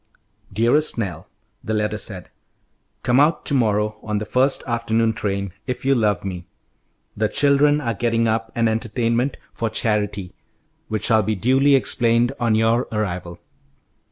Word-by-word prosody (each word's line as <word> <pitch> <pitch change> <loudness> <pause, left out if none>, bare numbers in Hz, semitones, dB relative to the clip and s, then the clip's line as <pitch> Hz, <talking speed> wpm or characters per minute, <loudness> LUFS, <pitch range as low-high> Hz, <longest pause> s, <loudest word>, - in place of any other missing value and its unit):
"Dearest 120 +10 +2
Nell," 90 -8 -4 0.4
the 110 - -2
letter 105 0 -1
said, 95 -4 -6 0.7
"come 120 +2 +3
out 150 +3 +2
to - - -1
morrow 110 -4 +1
on 105 -1 -2
the 105 - -3
first 130 +5 +2
afternoon 115 -2 0
train, 100 -3 -3
if 125 +1 -4
you 135 - +4
love 105 -6 +1
me. 90 -2 -6 0.7
The 110 0 0
children 145 +1 +3
are 120 -5 -2
getting 115 +1 0
up 110 0 -1
an 115 -1 +2
entertainment 115 +3 -1 0.2
for 115 - -2
charity, 105 -4 -2 0.5
which 110 -1 -3
shall 110 -2 +4
be 110 +1 -1
duly 135 +8 +3
explained 120 -2 +2
on 115 -3 +2
your 115 +3 +2
arrival. 90 -5 -3
115 Hz, 150 wpm, -21 LUFS, 105-120 Hz, 0.7 s, you